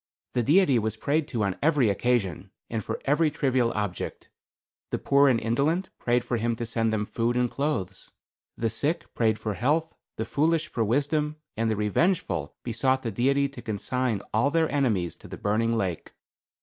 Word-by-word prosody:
The 125 Hz, -, +2 dB
Deity 145 Hz, -, +4 dB
was 110 Hz, 0 st, -2 dB
prayed 145 Hz, +5 st, 0 dB
to 120 Hz, -8 st, -1 dB
on 100 Hz, -2 st, -1 dB
every 145 Hz, -5 st, +3 dB
occasion, 100 Hz, -4 st, 0 dB, 0.2 s
and 110 Hz, -2 st, -2 dB
for -, -, -4 dB
every 150 Hz, +3 st, +3 dB
trivial 130 Hz, -4 st, +1 dB
object. 105 Hz, -4 st, -4 dB, 0.6 s
The -, -, -1 dB
poor 140 Hz, 0 st, +4 dB
and 120 Hz, -3 st, +3 dB
indolent 145 Hz, -, 0 dB
prayed 120 Hz, 0 st, +1 dB
for 120 Hz, 0 st, -1 dB
him 115 Hz, +1 st, 0 dB
to 120 Hz, +1 st, -4 dB
send 115 Hz, 0 st, 0 dB
them 105 Hz, -1 st, 0 dB
food 115 Hz, +3 st, -1 dB
and 125 Hz, -1 st, +1 dB
clothes. 140 Hz, -10 st, -3 dB, 0.5 s
The 115 Hz, -1 st, 0 dB
sick 145 Hz, +9 st, -2 dB
prayed 110 Hz, -2 st, +2 dB
for 110 Hz, -1 st, -3 dB
health, 150 Hz, +9 st, 0 dB, 0.2 s
the 110 Hz, -, -3 dB
foolish 155 Hz, +4 st, +1 dB
for 115 Hz, -, -1 dB
wisdom, 145 Hz, +6 st, 0 dB, 0.2 s
and 115 Hz, 0 st, 0 dB
the 110 Hz, -, +1 dB
revengeful 105 Hz, -, 0 dB
besought 130 Hz, +3 st, +1 dB
the 115 Hz, -, -2 dB
Deity 140 Hz, +6 st, +2 dB
to 135 Hz, -3 st, -10 dB
consign 115 Hz, 0 st, -2 dB
all 115 Hz, +6 st, +3 dB
their 160 Hz, +1 st, +1 dB
enemies 110 Hz, -12 st, +1 dB
to -, -, -13 dB
the -, -, -8 dB
burning 115 Hz, +3 st, +1 dB
lake. 95 Hz, -6 st, -3 dB
120 Hz, 180 wpm, -26 LUFS, 110-140 Hz, 0.6 s, Deity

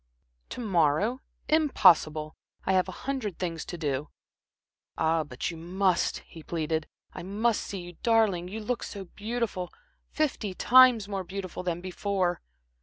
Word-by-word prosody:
"To -, -, -6 dB
morrow! 200 Hz, -, +2 dB, 0.3 s
Impossible! 170 Hz, -, +4 dB, 0.3 s
I 190 Hz, -, +2 dB
have 185 Hz, 0 st, +2 dB
a 185 Hz, -, -10 dB
hundred 255 Hz, -10 st, -2 dB
things 170 Hz, -3 st, -3 dB
to 175 Hz, -, -6 dB
do." 145 Hz, -2 st, -2 dB, 0.9 s
"Ah, 160 Hz, 0 st, +2 dB
but 135 Hz, +2 st, -4 dB
you 165 Hz, -, -8 dB
must," 180 Hz, +2 st, 0 dB
he 165 Hz, -, -12 dB
pleaded. 160 Hz, -1 st, -2 dB, 0.3 s
"I -, -, -7 dB
must 210 Hz, +5 st, 0 dB
see 195 Hz, -2 st, -5 dB
you. 175 Hz, -1 st, -11 dB
Darling 215 Hz, -7 st, +3 dB
you 215 Hz, +4 st, -6 dB
look 240 Hz, +3 st, -2 dB
so 200 Hz, -2 st, -6 dB
beautiful 210 Hz, -2 st, -3 dB, 0.4 s
fifty 250 Hz, -10 st, -1 dB
times 250 Hz, -4 st, +6 dB
more 195 Hz, -2 st, -3 dB
beautiful 185 Hz, 0 st, -6 dB
than 175 Hz, -1 st, -2 dB
before." 185 Hz, -1 st, -1 dB
185 Hz, 145 wpm, -28 LUFS, 170-220 Hz, 0.9 s, times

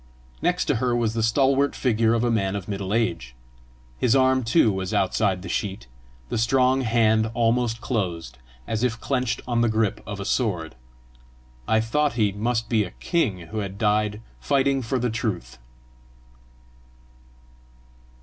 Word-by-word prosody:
Next 180 Hz, +1 st, +1 dB
to 145 Hz, -, +1 dB
her 120 Hz, +1 st, 0 dB
was 115 Hz, -2 st, 0 dB
the 115 Hz, -, -1 dB
stalwart 135 Hz, +4 st, +2 dB
figure 115 Hz, -2 st, +2 dB
of 115 Hz, -, 0 dB
a 120 Hz, -, +1 dB
man 100 Hz, -3 st, 0 dB
of 100 Hz, -3 st, -5 dB
middle 100 Hz, -1 st, -4 dB
age. 105 Hz, -, -1 dB, 0.6 s
His 125 Hz, 0 st, +3 dB
arm 130 Hz, -1 st, +3 dB
too 115 Hz, 0 st, +3 dB
was 95 Hz, -1 st, -3 dB
outside 95 Hz, -1 st, +1 dB
the -, -, -7 dB
sheet, 95 Hz, -, -3 dB, 0.4 s
the -, -, -1 dB
strong 130 Hz, +3 st, +3 dB
hand 110 Hz, -2 st, +2 dB
almost 115 Hz, 0 st, +1 dB
closed, 90 Hz, -, -3 dB, 0.3 s
as 110 Hz, -1 st, -2 dB
if 120 Hz, -2 st, 0 dB
clenched 130 Hz, -4 st, -1 dB
on 120 Hz, -1 st, +1 dB
the 120 Hz, -, +3 dB
grip 110 Hz, -2 st, 0 dB
of 105 Hz, -1 st, -5 dB
a 100 Hz, -, -5 dB
sword. 90 Hz, -, -1 dB, 0.9 s
I 110 Hz, 0 st, +3 dB
thought 145 Hz, +6 st, 0 dB
he 110 Hz, -4 st, +1 dB
must 115 Hz, +3 st, -1 dB
be 110 Hz, -3 st, +2 dB
a 90 Hz, -, -6 dB
king 125 Hz, -, 0 dB
who 110 Hz, -, -3 dB
had 100 Hz, -1 st, -5 dB
died 105 Hz, 0 st, +1 dB, 0.2 s
fighting 135 Hz, -1 st, +1 dB
for 130 Hz, +2 st, -2 dB
the 125 Hz, -1 st, -1 dB
truth. 105 Hz, -, -4 dB
115 Hz, 160 wpm, -24 LUFS, 105-125 Hz, 0.9 s, His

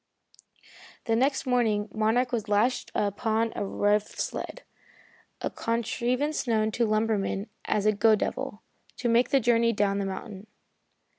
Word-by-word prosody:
The 225 Hz, -, +1 dB
next 270 Hz, +4 st, +1 dB
morning 225 Hz, -5 st, +1 dB
Monarch 225 Hz, +3 st, +1 dB
was 225 Hz, -3 st, -2 dB
lashed 215 Hz, +5 st, +1 dB
upon 220 Hz, +2 st, 0 dB
a -, -, -2 dB
rough 205 Hz, +1 st, +1 dB
sled -, -, -4 dB, 0.8 s
a -, -, -2 dB
contrivance 245 Hz, +5 st, -1 dB
known 220 Hz, -2 st, +2 dB
to 235 Hz, +1 st, +1 dB
lumbermen 215 Hz, -1 st, 0 dB, 0.2 s
as 210 Hz, -1 st, 0 dB
a 215 Hz, -, +5 dB
"go 215 Hz, +1 st, +4 dB
devil" 240 Hz, 0 st, -4 dB, 0.3 s
to 245 Hz, -, -2 dB
make 235 Hz, +1 st, +3 dB
the 275 Hz, -, +4 dB
journey 230 Hz, -1 st, +3 dB
down 200 Hz, -1 st, +1 dB
the 200 Hz, -, -1 dB
mountain. 195 Hz, +1 st, -7 dB
225 Hz, 140 wpm, -27 LUFS, 210-240 Hz, 0.8 s, a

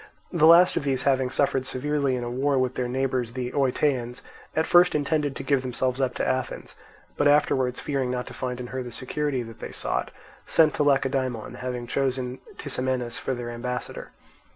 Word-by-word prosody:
The 160 Hz, -2 st, +5 dB
last 170 Hz, +2 st, +7 dB
of -, -, 0 dB
these 135 Hz, -2 st, 0 dB
having 130 Hz, -2 st, +2 dB
suffered 135 Hz, 0 st, +1 dB
severely 140 Hz, +1 st, -1 dB
in 125 Hz, -, -3 dB
a 120 Hz, -, -3 dB
war 135 Hz, +3 st, +1 dB
with 130 Hz, -1 st, +1 dB
their 125 Hz, -1 st, -2 dB
neighbours 130 Hz, -2 st, -1 dB
the 125 Hz, -1 st, -3 dB
Oetaeans, 130 Hz, -2 st, 0 dB, 0.3 s
at 160 Hz, -, +2 dB
first 175 Hz, -1 st, +5 dB
intended 145 Hz, -1 st, 0 dB
to -, -, -5 dB
give 135 Hz, -1 st, +2 dB
themselves 130 Hz, +1 st, -1 dB
up 130 Hz, -, 0 dB
to -, -, -1 dB
Athens; 130 Hz, -1 st, -2 dB, 0.4 s
but 145 Hz, -, +3 dB
afterwards 130 Hz, -3 st, +3 dB
fearing 135 Hz, -3 st, -1 dB
not 125 Hz, 0 st, -2 dB
to -, -, -10 dB
find 125 Hz, -1 st, -4 dB
in 125 Hz, -, -5 dB
her 130 Hz, -, -2 dB
the 125 Hz, -1 st, -7 dB
security 130 Hz, +2 st, -2 dB
that 115 Hz, -1 st, -11 dB
they -, -, -7 dB
sought, -, -, -1 dB, 0.4 s
sent 160 Hz, -2 st, +4 dB
to 150 Hz, -, +1 dB
Lacedaemon, 135 Hz, -5 st, 0 dB
having 125 Hz, -1 st, -4 dB
chosen 130 Hz, 0 st, -1 dB, 0.2 s
Tisamenus 130 Hz, -3 st, -2 dB
for 130 Hz, -, -2 dB
their 120 Hz, -1 st, -5 dB
ambassador. 125 Hz, +1 st, -5 dB
130 Hz, 190 wpm, -25 LUFS, 125-140 Hz, 0.4 s, last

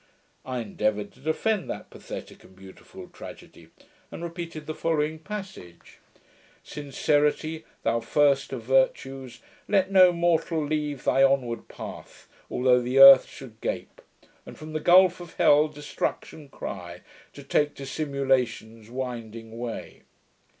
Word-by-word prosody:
I 130 Hz, -2 st, -4 dB
endeavoured 105 Hz, -1 st, -2 dB
to -, -, -23 dB
defend 185 Hz, +8 st, -1 dB
that -, -, -7 dB
pathetick -, -, -9 dB
and 95 Hz, -, -18 dB
beautiful 95 Hz, 0 st, -13 dB
tragedy, -, -, -12 dB, 0.4 s
and -, -, -8 dB
repeated 170 Hz, -2 st, -6 dB
the 155 Hz, -, -4 dB
following 155 Hz, -1 st, -1 dB
passage: 190 Hz, -, -9 dB, 0.3 s
'"... -, -, -31 dB
Sincerity, 150 Hz, +2 st, 0 dB, 0.2 s
Thou 115 Hz, +1 st, +1 dB
first 140 Hz, +4 st, +2 dB
of 125 Hz, -4 st, -5 dB
virtues! 130 Hz, -1 st, 0 dB, 0.3 s
let 195 Hz, -2 st, +2 dB
no 185 Hz, -2 st, +7 dB
mortal 170 Hz, -2 st, 0 dB
leave 150 Hz, -2 st, -3 dB
Thy 135 Hz, -, +2 dB
onward 130 Hz, -4 st, +1 dB
path, -, -, -10 dB, 0.2 s
although 125 Hz, 0 st, +3 dB
the 125 Hz, +2 st, -2 dB
earth 135 Hz, -1 st, +10 dB
should 115 Hz, -5 st, -12 dB
gape, -, -, -5 dB, 0.4 s
And -, -, -12 dB
from 155 Hz, 0 st, -9 dB
the 155 Hz, -, -1 dB
gulph 180 Hz, 0 st, +5 dB
of 175 Hz, -1 st, -11 dB
hell 150 Hz, +1 st, +5 dB
destruction 150 Hz, 0 st, -5 dB
cry. 90 Hz, -8 st, -8 dB, 0.3 s
To -, -, -11 dB
take 150 Hz, 0 st, 0 dB
dissimulation's 130 Hz, -6 st, -2 dB
winding 115 Hz, -3 st, -6 dB
way."' 120 Hz, -2 st, -6 dB
135 Hz, 130 wpm, -26 LUFS, 120-155 Hz, 0.4 s, earth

